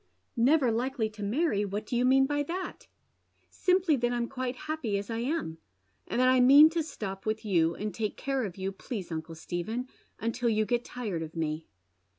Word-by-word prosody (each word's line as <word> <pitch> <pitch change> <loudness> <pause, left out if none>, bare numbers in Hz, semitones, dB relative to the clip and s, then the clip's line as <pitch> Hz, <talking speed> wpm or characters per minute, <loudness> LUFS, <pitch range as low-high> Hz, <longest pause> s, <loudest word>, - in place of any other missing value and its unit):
" - - -47
Never 260 +1 +4
likely 235 -1 -1
to 215 0 -11
marry! 210 +1 +1
what 205 +1 -3
do 240 - -3
you 245 +1 +2
mean 270 +1 +5
by 290 +1 0
that? 355 +6 -5 0.2
" - - -46
" - - -41
Simply 365 -4 +2
that 240 0 0
I'm 240 -1 -1
quite 255 -1 -3
happy 290 -10 -1
as 200 +3 -5
I 225 - -2
am, 245 - -2 0.5
and - - -1
that 255 - +5
I 255 0 +5
mean 285 +5 +8
to 335 0 0
stop 210 -10 -6
with 220 0 -2
you, 170 -5 +2
and 210 0 -4
take 215 -2 -3
care 270 -2 -1
of 195 -4 -5
you, 190 0 -2
please 195 -2 -6
uncle 160 0 -5
Stephen, 180 +10 -4 0.3
until 230 +1 -1
you 215 -1 +2
get 240 +1 0
tired 215 -11 -4
of 160 0 -7
me." 155 -1 -2
235 Hz, 210 wpm, -29 LUFS, 200-265 Hz, 0.5 s, mean